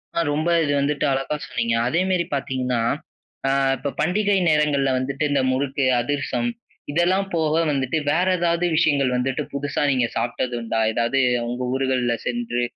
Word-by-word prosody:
ஆ. - - +1
ரொம்ப 155 +3 0 0.2
இது 145 - 0
வந்துட்டு 145 +1 0
அழகா 135 +3 -1
சொன்னீங்க. 115 -2 -1
அதேமாரி 180 +5 +1
பார்த்தீங்கன்னா, 130 -3 -1 0.7
அ - - +2 0.3
இப்ப 140 +2 -3
பண்டிகை 200 +5 +2
நேரங்கள்ல 150 -3 +2
வந்துட்டு 135 +3 -2
இந்த 140 -1 +2
முறுக்கு, 135 +1 0 0.2
அதிர்சம் 145 - -1 0.4
இதெல்லாம் 180 +5 +2
போக 160 -2 +1 0.2
வந்துட்டு, 135 +1 -1
வேற 180 +4 +2
ஏதாவது 170 0 +1
விஷயங்கள் 145 -5 +2
வந்துட்டு 130 +3 -1
புதுசா 140 0 -2
நீங்க 125 -3 +1
சாப்பிட்டதுண்டா? 120 -1 -2
எதாவது 120 +4 +1 0.3
உங்க 125 +1 -3
ஊர்கள்ல 130 -2 +1
சென்று 120 0 -2
140 Hz, 140 wpm, -22 LUFS, 125-155 Hz, 0.7 s, அ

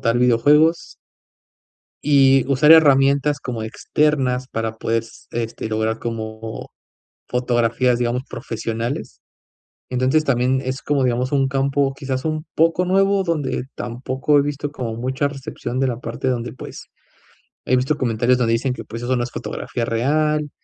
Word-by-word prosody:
tal 115 +1 +1
videojuegos. 145 +7 +3 1.1
Y 135 -2 +5
usar 140 +3 +5
herramientas 140 -1 +4
como 120 -3 -4
externas 130 +1 0
para 115 -2 -3
poder, 115 0 -1
s 115 - -16
este, 115 -1 -4
lograr 110 +1 -1
como 110 -1 -6 0.6
fotografías 120 0 +1
digamos, 120 +1 -1
profesionales. 115 +3 -4 0.7
Entonces, 130 +5 +2
también 130 -1 +1
es 130 -1 -3
como 140 +1 0
digamos, 125 +1 0
un 135 -1 +2
campo, 135 0 0
quizás 130 -1 -3
un 155 0 -2
poco 165 +3 +2
nuevo, 195 +1 +2
donde 145 -8 -1
tampoco 130 +4 -1
he - - +5
visto, 145 0 -3
como 115 -5 -4
mucha 130 +4 -1
recepción 130 -3 -5
de 135 - +2
la 120 - -2
parte, 120 +1 -4
donde, 125 -2 -2
pues, 130 - -10 0.8
he 130 - +2
visto 130 +4 +1
comentarios 120 +1 +1
donde 115 -2 +1
dicen 125 +3 0
que, - - -7
pues, 115 +1 -7
eso 130 +1 0
no 120 - 0
es 120 - -6
fotografía 120 - -4
real, 150 +6 0
130 Hz, 150 wpm, -21 LUFS, 120-145 Hz, 1.1 s, Y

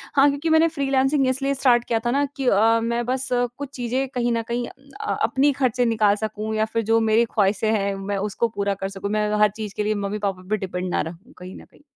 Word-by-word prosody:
हाँ, 275 0 +6
क्योंकि 285 +3 -2
मैंने 320 +1 +5
फ्रीलांसिंग 275 -2 +1
इसलिए 270 +2 0
स्टार्ट 250 -3 +3
किया 230 - 0
था 240 - +1
ना 280 +3 +2
कि 270 -2 -2
अ, 225 +2 +4
मैं 235 +1 -1
बस 260 +2 -1
कुछ 245 +3 -2
चीज़ें 255 +2 -1
कहीं 240 -2 -1
न 230 0 -1
कहीं 240 0 -2 0.3
अ, 430 - -2
अपनी 280 +2 +3
खर्चे 250 -1 +2
निकाल 215 -3 +3
सकूँ 215 0 -4
या 215 0 +2
फिर 230 0 +1
जो 225 - +5
मेरी 230 +2 +4
ख्वाहिशें 205 +1 +2
हैं 200 -2 0
मैं 195 +1 -3
उसको 205 +3 -1
पूरा 200 0 0
कर 195 - -1
सकूँ 195 0 -5
मैं 210 0 0
हर 210 - +6
चीज़ 210 -3 -6
के 210 - -1
लिए 215 +1 0
मम्मी-पापा 200 -2 -3
पे 215 - +1
डिपेंड 185 -2 -4
ना - - +1
रहूँ 175 - -9
कहीं 180 +1 -9
न - - -13
कहीं। - - -24
230 Hz, 235 wpm, -23 LUFS, 205-260 Hz, 0.3 s, हाँ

